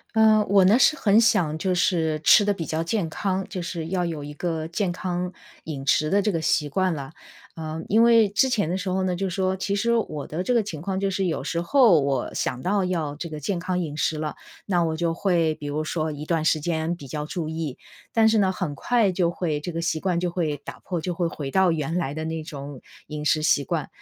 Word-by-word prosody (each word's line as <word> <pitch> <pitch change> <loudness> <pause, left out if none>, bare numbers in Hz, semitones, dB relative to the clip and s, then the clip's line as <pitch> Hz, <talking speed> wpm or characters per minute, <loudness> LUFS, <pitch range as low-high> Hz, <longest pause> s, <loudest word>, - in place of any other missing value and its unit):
呃， 215 -1 +5
我 195 -2 +5
呢 215 +7 +5
是 305 - +5
很 210 +1 +4
想 170 -9 +2
就 185 +1 0
是 160 -4 +1
吃 210 - +7
得 205 - +2
比 175 -5 -3
较 160 +1 -2
健 175 +1 -1
康， 190 0 -1
就 185 - -5
是 170 -2 -5
要 180 -1 0
有 160 -4 -4
一 145 +1 -7
个 160 0 -3
健 180 +2 -1
康 180 0 -3 0.3
饮 140 -4 -5
食 155 +2 +2
的 200 - +3
这 210 - +1
个 165 -3 -2
习 150 -1 +1
惯 185 +4 0
了。 140 -1 -7 0.4
呃， 160 -1 -5
因 220 +3 +4
为 230 -2 +6
之 210 +7 +2
前 215 -9 +1
的 - - 0
时 190 0 -3
候 190 +1 0
呢， 185 -1 0
就 195 +2 -2
说 185 +1 0
其 195 +1 -2
实 235 +4 +1
我 155 -11 -1
的 160 +4 -4
这 185 - -1
个 230 - +3
情 165 -7 -6
况， 190 +2 -2
就 195 0 0
是 190 0 -1
有 165 - -2
时 170 - -2
候， 215 - +5
我 135 -2 -1
想 125 - -2
到 195 +2 +1
要 160 -5 -2
这 170 +2 -5
个 155 -1 -6
健 175 +5 -2
康 180 +1 -2
饮 155 -4 -4
食 155 +1 0
了， 150 0 -3 0.3
那 175 -4 +1
我 160 -1 -1
就 170 0 0
会 170 -3 +1
比 150 -2 -8
如 150 +2 -2
说 155 0 -2
一 150 0 -7
段 165 -1 0
时 160 0 +2
间 160 +1 -1
比 145 -5 -11
较 150 +3 -4
注 165 -1 -4
意。 160 -4 -4 0.3
但 225 -1 +4
是 220 0 +4
呢， 190 -2 +3
很 180 -5 -3
快 225 +5 +2
就 175 -2 +1
会 165 -3 -2
这 165 +4 -5
个 165 - -4
习 165 -1 -1
惯 180 0 0
就 175 0 -1
会 160 -4 -1
打 - - -8
破， 180 -2 -4
就 175 +3 -3
会 175 0 0
回 145 -4 -5
到 190 +1 +4
原 160 0 -2
来 150 -5 -2
的 160 0 -4
那 160 0 -3
种 140 -3 -8 0.3
饮 150 -1 -5
食 155 0 +2
习 155 -3 +3
惯。 160 0 -2
170 Hz, 270 characters per minute, -24 LUFS, 155-190 Hz, 0.4 s, 吃